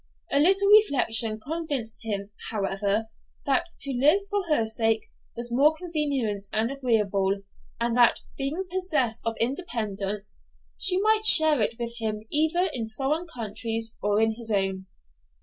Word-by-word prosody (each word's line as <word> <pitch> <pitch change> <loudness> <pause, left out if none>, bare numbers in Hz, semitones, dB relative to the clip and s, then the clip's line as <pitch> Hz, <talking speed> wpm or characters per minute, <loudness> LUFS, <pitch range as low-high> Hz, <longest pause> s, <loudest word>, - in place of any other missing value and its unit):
A 280 - +1
little 390 +6 +3
reflection 245 - +4
convinced 285 -4 -5
him, 205 -2 -4 0.2
however, 205 +1 -3 0.4
that 280 +5 -1
to 280 - +2
live 295 +10 +2
for 410 0 -1
her 300 -8 +1
sake 225 0 -1 0.3
was 240 0 -3
more 290 +6 +2
convenient 280 - -4
and 220 +3 -2
agreeable, 205 -7 -2 0.4
and 235 0 -2
that, 240 -1 +2
being 290 +7 -4
possessed 310 -12 -2
of 225 - -2
independence, 210 - -4 0.3
she 370 0 +5
might 435 +1 +1
share 315 - +10
it 220 +2 +1
with 235 0 -7
him 215 -1 -5
either 320 +5 0
in 225 -3 -5
foreign 285 +9 -4
countries 225 -3 -3
or 205 0 -1
in 225 0 +1
his 225 0 -10
own. 195 -2 -2
235 Hz, 145 wpm, -24 LUFS, 215-305 Hz, 0.4 s, share